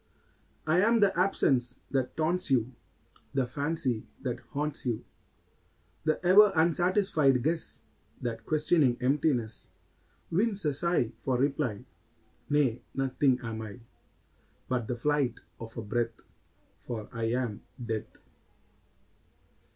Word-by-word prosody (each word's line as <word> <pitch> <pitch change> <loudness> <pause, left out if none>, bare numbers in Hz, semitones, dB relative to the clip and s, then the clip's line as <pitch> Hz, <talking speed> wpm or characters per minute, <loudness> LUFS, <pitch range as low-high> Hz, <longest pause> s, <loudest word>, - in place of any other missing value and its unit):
I 160 +3 +3
am 230 +3 +4
the 200 -2 +4
absence 135 -9 +1
that 130 -2 -1
taunts 170 +3 0
you, 130 -1 +2 0.6
The 135 -2 +2
fancy 140 -3 -2 0.2
that 125 -2 -2
haunts 145 -2 -3
you; 115 -3 -2 1.0
The 155 -1 +2
ever 200 +3 +8
unsatisfied 165 - +3
guess 160 +2 -2 0.4
That, 115 -2 -4
questioning 150 -3 +2
emptiness, 130 -3 0 0.6
Wins 200 +1 +1
a 150 - +2
sigh 145 -6 +1
for 130 -2 +1
reply. 130 -4 0 0.6
Nay; 140 -5 +2
nothing 135 -1 +2
am 110 -1 -4
I, 110 +2 -8 0.9
But 125 -3 -1
the 120 - -2
flight 140 -2 +1 0.2
of 115 0 -9
a 115 - -3
breath 115 +3 -1 0.6
For 110 -3 -6
I 115 0 -2
am 125 -5 -2 0.2
Death! 115 -3 -4
135 Hz, 115 wpm, -29 LUFS, 120-160 Hz, 1.0 s, ever